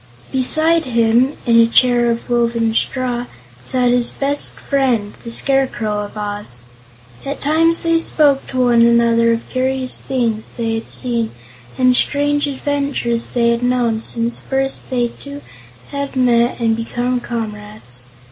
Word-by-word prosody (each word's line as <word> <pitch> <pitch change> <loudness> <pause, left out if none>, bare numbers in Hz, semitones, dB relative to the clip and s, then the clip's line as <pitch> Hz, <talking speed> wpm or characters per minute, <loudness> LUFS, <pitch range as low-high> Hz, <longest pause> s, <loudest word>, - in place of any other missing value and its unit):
Beside 315 +5 +3
him, 235 +2 +2
in 230 -2 +4
a 230 - +6
chair 240 0 +3
of 235 0 -3
woven 235 -2 0
straw, 245 0 -1 0.3
sat 245 - 0
his 245 -1 +2
best 285 +1 +1
friend, 250 -7 -1
the 235 - -7
Scarecrow 240 -5 +1
of 205 +1 -7
Oz. 205 - -5 0.6
At 280 +1 -5
times 325 +3 +2
they 330 0 +2
spoke 290 -4 +2
to 255 -1 -1
one 240 -1 +4
another 235 0 +4
of 230 0 -2
curious 260 0 -1
things 235 -5 -2
they 230 -2 -2
had 225 0 -5
seen 235 -3 0 0.5
and 255 -1 +3
strange 290 +2 +1
adventures 280 -4 -2
they 235 -1 +1
had 235 0 -1
known 245 -3 0
since 230 +1 -2
first 270 0 -3
they 245 -2 0
two 285 +3 -11 0.5
had 280 -1 -4
met 245 -1 +2
and 225 -1 +1
become 240 +2 -2
comrades. 210 - -6
245 Hz, 145 wpm, -17 LUFS, 230-270 Hz, 0.6 s, a